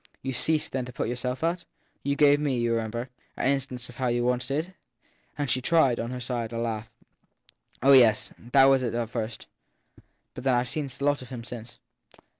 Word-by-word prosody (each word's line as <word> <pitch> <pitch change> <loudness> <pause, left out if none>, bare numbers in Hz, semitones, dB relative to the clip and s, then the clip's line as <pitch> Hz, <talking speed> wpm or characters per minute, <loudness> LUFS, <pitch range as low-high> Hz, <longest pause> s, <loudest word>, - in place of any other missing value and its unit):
You 135 - -2
ve 120 - -1
ceased 160 -1 +1
then 130 -1 -2
to 125 - -8
put 115 - -3
yourself 125 +3 -3
out? 170 +1 0 0.4
You 140 0 0
gave 145 0 +5
me, 140 -4 0
you 120 -1 +1
remember, 115 +2 -3 0.3
an 135 - +2
instance 130 -3 -3
of 120 - -13
how 130 - 0
you 120 0 +1
once 125 0 0
did! 155 +7 -2 0.6
And 145 -1 -1
she 130 - +1
tried, 135 -4 +3
on 115 - -3
her 125 0 -5
side, 120 -2 -3
a 115 - -4
laugh. 110 -1 -3 0.9
Oh 140 - +6
yes 115 -5 +5
that 135 +3 +4
was 135 -1 +5
at 120 -2 -2
first. 115 -1 -4 0.9
But 135 - -5
I 125 -2 +3
ve - - -9
seen 145 -1 -3
such 130 +2 -8
a - - 0
lot 145 -1 +2
of 130 - -10
him 125 -3 -7
since. 120 +1 -9
125 Hz, 215 wpm, -27 LUFS, 120-140 Hz, 0.9 s, Oh